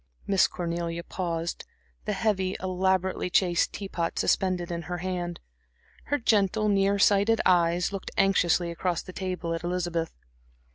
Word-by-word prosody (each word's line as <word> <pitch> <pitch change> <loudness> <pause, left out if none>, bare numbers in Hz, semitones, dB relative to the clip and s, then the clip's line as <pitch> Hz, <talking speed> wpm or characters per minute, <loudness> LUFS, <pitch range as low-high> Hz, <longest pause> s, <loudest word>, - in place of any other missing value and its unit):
Miss 195 -1 +4
Cornelia 170 -1 -3
paused, 170 -2 -3 0.4
the - - -1
heavy, 190 -4 0
elaborately 185 0 0
chased 175 -1 +2
tea 200 - -5
pot 170 -3 -3
suspended 180 -2 +1
in 170 0 -3
her 175 - -2
hand. 175 -1 -3 0.7
Her 290 - 0
gentle, 215 -3 +2
near 200 0 +3
sighted 205 +2 +4
eyes 175 +1 +3
looked 195 - -5
anxiously 180 -3 +3
across 170 0 -2
the 185 - -10
table 180 -3 -3
at 165 0 -4
Elizabeth. 175 -2 -2
180 Hz, 140 wpm, -27 LUFS, 170-195 Hz, 0.7 s, Miss